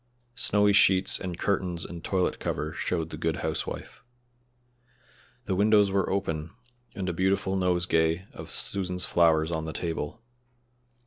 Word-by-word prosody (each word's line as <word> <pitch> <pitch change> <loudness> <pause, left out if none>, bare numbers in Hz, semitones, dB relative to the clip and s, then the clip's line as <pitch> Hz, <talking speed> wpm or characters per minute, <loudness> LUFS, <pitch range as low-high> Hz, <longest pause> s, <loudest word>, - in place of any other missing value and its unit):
Snowy 105 -3 +3
sheets 95 -1 +5
and 90 -3 -5
curtains 90 -4 -1
and 85 -1 -8
toilet 95 -2 0
cover 75 +1 -3
showed 80 -1 -2
the - - -6
good - - -1
housewife. - - -4 1.4
The - - -1
windows 105 +1 +4
were 100 0 +1
open, 80 -5 -2 0.5
and 95 -4 -3
a 90 - -1
beautiful 95 +2 +1
nosegay 90 -2 +1
of - - -9
Susan's 90 -2 -1
flowers 80 -1 +3
on 80 -1 -2
the 80 - -5
table. 85 +4 -4
90 Hz, 135 wpm, -27 LUFS, 85-95 Hz, 1.4 s, sheets